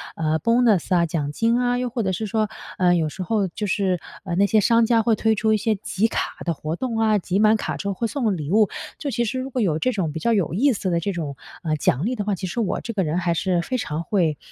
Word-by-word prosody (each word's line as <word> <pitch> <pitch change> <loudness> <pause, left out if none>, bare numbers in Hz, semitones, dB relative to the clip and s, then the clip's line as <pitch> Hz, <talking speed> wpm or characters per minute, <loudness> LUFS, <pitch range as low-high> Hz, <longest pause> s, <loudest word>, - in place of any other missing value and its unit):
呃， 160 -1 0
bonus 230 -2 +3
啊， 170 -1 +3
奖 150 -3 -2
金 230 +8 +1
啊。 245 0 +1
又 250 0 -1
或 235 -1 -2
者 190 - 0
是 200 +5 -2
说， 215 0 0 0.3
呃， 180 -1 +4
有 160 -2 +1
时 185 +4 -6
候 205 0 0
就 210 +4 -4
是， 185 -2 0 0.2
呃， 175 -3 -3
那 200 +2 +4
些 215 +1 +3
商 230 +2 +4
家， 230 0 +3
会 225 0 +2
推 220 0 +2
出 220 +1 +2
一 215 - +3
些 220 +1 0
集 220 +1 0
卡 - - -2
的 170 - +1
活 155 +1 -4
动 235 +3 -3
啊， 220 -1 +3
集 185 0 -1
满 215 +1 +5
卡 - - -3
之 200 - -5
后 200 - 0
会 230 +4 -2
送 225 -7 0
礼 150 +1 -5
物。 215 0 +5 0.3
就 290 - -4
其 240 -1 0
实 245 +4 -2
如 260 +1 -4
果 255 -2 -2
有 160 -6 +1
这 255 - +1
种 185 -9 -1
比 160 - -5
较 235 +4 +1
有 190 -7 0
意 260 +8 +3
思 195 - -2
的 170 -1 +1
这 200 +4 -2
种， 155 -6 -4 0.3
呃， 155 -2 0
奖 145 +3 +1
励 255 - 0
的 210 - -2
话， 205 -2 0
其 185 - -5
实 235 - -4
我 215 - -1
这 230 - -5
个 195 - 0
人 155 +1 -1
还 170 -1 +1
是 175 0 0
非 255 +8 -2
常 160 -8 -3
会， 170 -8 +1
200 Hz, 320 characters per minute, -23 LUFS, 170-230 Hz, 0.3 s, 满